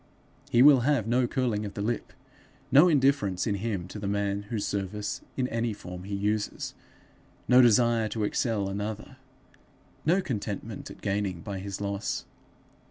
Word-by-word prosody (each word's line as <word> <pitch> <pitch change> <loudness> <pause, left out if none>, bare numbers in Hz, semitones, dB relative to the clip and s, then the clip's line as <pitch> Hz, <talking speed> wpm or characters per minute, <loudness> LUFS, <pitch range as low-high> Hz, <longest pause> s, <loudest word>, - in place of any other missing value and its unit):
He 120 +1 +5
will 140 -2 +8
have 130 -3 +1
no 120 +2 +2
curling 120 -5 -1
of 100 -1 -6
the 100 - -3
lip; 115 +1 -2 0.6
no 145 +7 +8
indifference 135 - +2
in 105 - 0
him 100 -3 -3
to 105 - -7
the 100 - -4
man 100 0 -1
whose 110 -4 -2
service 100 +1 -3 0.2
in 130 -2 +1
any 115 -1 -1
form 90 -2 -9
he 100 0 -3
uses; 105 +1 -2 0.7
no 125 +1 +7
desire 115 -2 +4
to 110 +1 -2
excel 105 -1 0
another, 105 +5 -5 0.9
no 175 +5 +3
contentment 105 - -4
at - - -12
gaining 95 -3 -1
by 95 +2 -5
his 100 0 -5
loss. 100 0 -3
105 Hz, 160 wpm, -28 LUFS, 100-120 Hz, 0.9 s, will